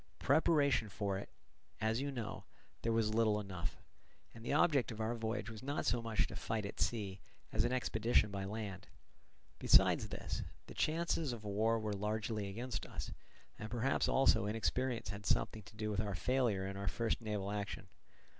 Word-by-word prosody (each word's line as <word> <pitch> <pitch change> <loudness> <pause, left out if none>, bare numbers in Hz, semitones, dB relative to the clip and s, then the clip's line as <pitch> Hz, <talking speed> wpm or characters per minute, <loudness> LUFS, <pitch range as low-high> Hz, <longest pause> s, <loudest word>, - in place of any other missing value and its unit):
Preparation 140 -5 +3
for 100 0 -1
it, - - -8 0.5
as 110 +3 +1
you 140 - -1
know, 120 -6 -5 0.4
there 115 - +1
was 110 -1 +2
little 110 -2 +3
enough; 95 -5 -4 0.6
and 115 - -11
the - - -2
object 145 -4 +4
of 110 - -7
our 110 +2 0
voyage 110 -1 -2
was 110 -2 -7
not 140 +3 -2
so 115 +3 +2
much 115 -2 +1
to - - -7
fight 110 -2 -2
at 100 - -6
sea 100 -4 -1 0.3
as - - +2
an - - +1
expedition 115 -4 +2
by 100 -1 -3
land. 100 -1 -5 0.7
Besides - - +5
this, - - -3 0.2
the - - -10
chances 160 -3 +1
of 115 -2 -7
war 110 +3 +2
were 110 -2 -2
largely 105 +1 -1
against 120 +6 -4
us; - - -5 0.5
and 105 - -5
perhaps 120 +3 +1
also 130 -6 +4
inexperience 115 +1 0
had 100 +1 -5
something 110 - +1
to 105 +2 -15
do 110 0 -2
with 105 0 +1
our 100 -3 -2
failure 120 -4 +1
in 95 0 -4
our 100 0 -4
first 115 +3 0
naval 105 -3 -2
action. 100 -2 -4
110 Hz, 180 wpm, -36 LUFS, 105-120 Hz, 0.7 s, Besides